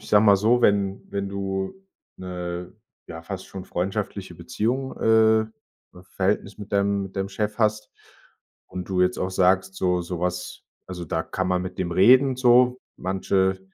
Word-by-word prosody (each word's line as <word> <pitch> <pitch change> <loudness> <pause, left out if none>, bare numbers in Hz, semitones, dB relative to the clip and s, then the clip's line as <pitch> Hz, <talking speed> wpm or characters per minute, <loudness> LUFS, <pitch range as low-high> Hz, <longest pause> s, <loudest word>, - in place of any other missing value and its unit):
ich - - -13
sage 105 +1 +5
mal 100 -1 +7
so, 115 +5 +3
wenn 100 -3 +2
wenn 100 0 -3
du 95 -1 -3 0.4
'ne, 90 -1 -6 0.3
ja 80 0 -9
fast 95 +2 -7
schon 95 -1 -8
freundschaftliche 90 +2 -4
Beziehung 130 +5 -2
äh, 110 0 +4 0.5
V 90 - -14
Verhältnis 100 +3 -2
mit 105 0 -10
deinem 100 0 +1
mit 95 0 -11
deinem 95 0 -1
Chef 105 +1 -3
hast 105 -1 0 0.8
und 90 -1 -7
du 95 -1 +1
jetzt 90 - +1
auch 90 - -2
sagst, 95 +1 +2
so 90 -1 +1
sowas 90 +1 -4 0.3
also, 90 -1 -6
da - - -1
kann 95 -1 -3
man 90 0 +1
mit 90 0 -7
dem 90 -2 -2
reden, 130 +8 +5
so, 125 0 +4 0.2
manche 95 0 0
95 Hz, 165 wpm, -24 LUFS, 90-105 Hz, 0.8 s, mal